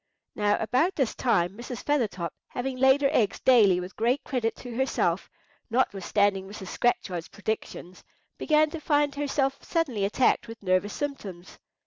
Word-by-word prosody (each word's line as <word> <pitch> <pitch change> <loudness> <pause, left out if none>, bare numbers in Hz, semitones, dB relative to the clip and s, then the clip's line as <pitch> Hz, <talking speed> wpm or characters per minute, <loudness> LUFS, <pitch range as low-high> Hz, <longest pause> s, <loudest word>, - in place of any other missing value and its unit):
Now 205 0 +1
about 255 - +1
this 265 -6 0
time 180 -7 +1
Mrs. 240 0 -7
Feathertop, 210 - -1
having 260 +1 -4
laid 265 +2 +4
her 275 - +4
eggs 225 -9 +1
daily 210 -8 +5
with 180 +1 -7
great 240 +5 +1
credit 240 -4 -1
to 245 -2 -9
herself, 265 +2 0 0.4
notwithstanding 200 -4 +1
Mrs. 195 -2 -8
Scratchard's 180 -8 -1
predictions, 205 -4 -5 0.4
began 310 -1 +3
to 330 - -5
find 290 -2 +2
herself 280 -1 -1
suddenly 280 - -1
attacked 235 +3 +2
with 225 -2 -10
nervous 185 +2 +1
symptoms. 200 -12 -6
235 Hz, 145 wpm, -27 LUFS, 200-270 Hz, 0.4 s, daily